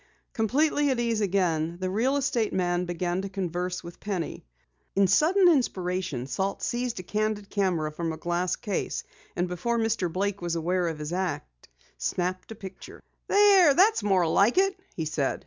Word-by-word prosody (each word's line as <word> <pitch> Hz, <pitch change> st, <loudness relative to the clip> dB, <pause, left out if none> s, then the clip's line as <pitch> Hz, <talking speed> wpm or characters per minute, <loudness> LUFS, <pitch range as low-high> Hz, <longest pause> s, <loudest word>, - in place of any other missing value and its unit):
Completely 290 Hz, +6 st, +2 dB
at 260 Hz, -3 st, 0 dB
ease 230 Hz, -2 st, 0 dB
again, 175 Hz, -4 st, 0 dB
the 185 Hz, -, -2 dB
real 230 Hz, +9 st, +1 dB
estate 245 Hz, -6 st, 0 dB
man 175 Hz, -1 st, 0 dB
began 175 Hz, +1 st, -2 dB
to 195 Hz, -, -5 dB
converse 180 Hz, -1 st, -3 dB
with 170 Hz, 0 st, -10 dB
Penny. 190 Hz, -5 st, -4 dB, 0.5 s
In 195 Hz, 0 st, +4 dB
sudden 335 Hz, -, +4 dB
inspiration, 185 Hz, -, 0 dB
Salt 195 Hz, +8 st, -2 dB
seized 240 Hz, -3 st, -2 dB
a -, -, -6 dB
candid 210 Hz, +1 st, -2 dB
camera 180 Hz, -7 st, 0 dB
from 165 Hz, +1 st, -3 dB
a 160 Hz, -, -6 dB
glass 175 Hz, +2 st, -1 dB
case, 205 Hz, -3 st, -3 dB, 0.3 s
and 175 Hz, +1 st, 0 dB
before 180 Hz, +7 st, -1 dB
Mr. 225 Hz, -6 st, 0 dB
Blake 200 Hz, +2 st, -2 dB
was 170 Hz, -1 st, -2 dB
aware 175 Hz, +2 st, 0 dB
of 160 Hz, -2 st, -3 dB
his 150 Hz, +2 st, -5 dB
act, 60 Hz, -, -4 dB, 0.3 s
snapped 180 Hz, -, -2 dB
a -, -, -6 dB
picture. 190 Hz, -3 st, -10 dB, 0.3 s
"There, 390 Hz, -7 st, +6 dB
that's 400 Hz, -, +4 dB
more 190 Hz, -4 st, +2 dB
like 200 Hz, -, +3 dB
it," 390 Hz, 0 st, +3 dB, 0.2 s
he 160 Hz, -, -3 dB
said. 150 Hz, -3 st, -1 dB
190 Hz, 170 wpm, -27 LUFS, 175-225 Hz, 0.5 s, There